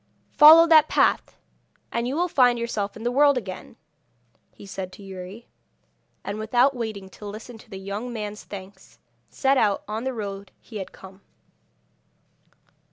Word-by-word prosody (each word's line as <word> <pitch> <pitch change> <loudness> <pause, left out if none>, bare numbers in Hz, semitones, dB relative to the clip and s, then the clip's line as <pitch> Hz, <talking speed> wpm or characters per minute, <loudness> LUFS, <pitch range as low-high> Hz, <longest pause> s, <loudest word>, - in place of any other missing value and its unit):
'Follow 320 +2 +9
that 315 -2 +6
path, - - +1 0.5
and 235 +1 -2
you 265 - -2
will 350 +3 +1
find 250 -7 +3
yourself 220 -4 -3
in 220 - -9
the 240 - 0
world 285 +1 +4
again,' 190 -6 -7 0.8
he - - -14
said 190 -1 -6
to 200 - -13
Youri; 190 +4 -9 0.8
and 205 +2 -5
without 245 +5 +2
waiting 215 -5 -5
to - - -15
listen 220 +4 -9
to 220 - -18
the 195 - -8
young 200 +5 -5
man's 210 -2 -6
thanks, 195 0 -12 0.3
set 270 0 +1
out 205 -2 +1
on 215 +2 -4
the 260 0 -2
road 200 -2 -6
he 220 - -10
had 190 - -7
come. 190 +1 -14
220 Hz, 160 wpm, -24 LUFS, 200-250 Hz, 0.8 s, Follow